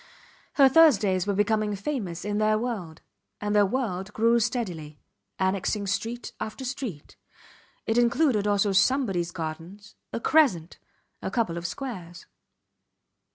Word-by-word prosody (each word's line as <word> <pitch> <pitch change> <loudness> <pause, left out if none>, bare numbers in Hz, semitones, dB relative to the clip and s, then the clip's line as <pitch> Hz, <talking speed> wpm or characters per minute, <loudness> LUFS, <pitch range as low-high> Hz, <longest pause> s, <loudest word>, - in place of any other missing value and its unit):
Her 275 -2 +6
Thursdays 210 - +4
were 200 - 0
becoming 210 0 +1
famous 200 - -4
in 205 0 -1
their 215 0 +3
world; 210 -9 -4 0.4
and 205 0 -2
their 205 -1 +5
world 205 -4 -3
grew 230 +2 +3
steadily, 185 - -3 0.4
annexing 195 +2 0
street 230 +5 -3
after 220 +5 -5
street. 250 - -6 0.7
It 225 +2 +2
included 240 -3 +2
also 205 0 +2
Somebodys 195 -4 +2
Gardens, 170 +4 -7 0.2
a - - -3
Crescent 235 - +2 0.4
a - - -3
couple 225 -9 -1
of 170 0 -3
Squares. 180 -7 -7
210 Hz, 125 wpm, -26 LUFS, 185-240 Hz, 0.7 s, Her